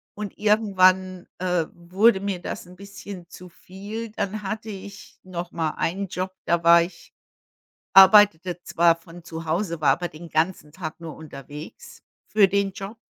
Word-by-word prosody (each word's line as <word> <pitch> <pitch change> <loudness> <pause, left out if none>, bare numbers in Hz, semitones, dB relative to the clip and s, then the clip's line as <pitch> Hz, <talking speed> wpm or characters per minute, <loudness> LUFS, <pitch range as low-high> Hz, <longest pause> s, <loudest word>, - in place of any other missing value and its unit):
und 210 -1 -7
irgendwann, 185 -4 +2
äh, 180 -3 0
wurde 190 +5 +2
mir 195 -2 -3
das - - -6
'n 180 - -14
bisschen 200 -2 -10
zu 180 - -12
viel. 205 +6 -8
Dann 210 0 -4
hatte 215 +2 -5
ich 200 -1 -10
nochmal 170 -3 -4
einen 195 +4 -2
Job, 185 +1 -4
da 170 0 +1
war 170 0 +7
ich 170 -1 -8 0.8
arbeitete 190 -3 +6
zwar 170 0 +3
von 165 +1 -15
zu 165 -1 -7
Hause, 170 0 -2
war 140 -3 +4
aber 175 +6 0
den 165 +2 -12
ganzen 160 -1 -1
Tag 165 -2 -7
nur 160 -3 -8
unterwegs 145 -1 -11 0.3
für 210 -2 +5
den 200 0 0
Job. 195 +4 -8
185 Hz, 155 wpm, -24 LUFS, 170-200 Hz, 0.8 s, war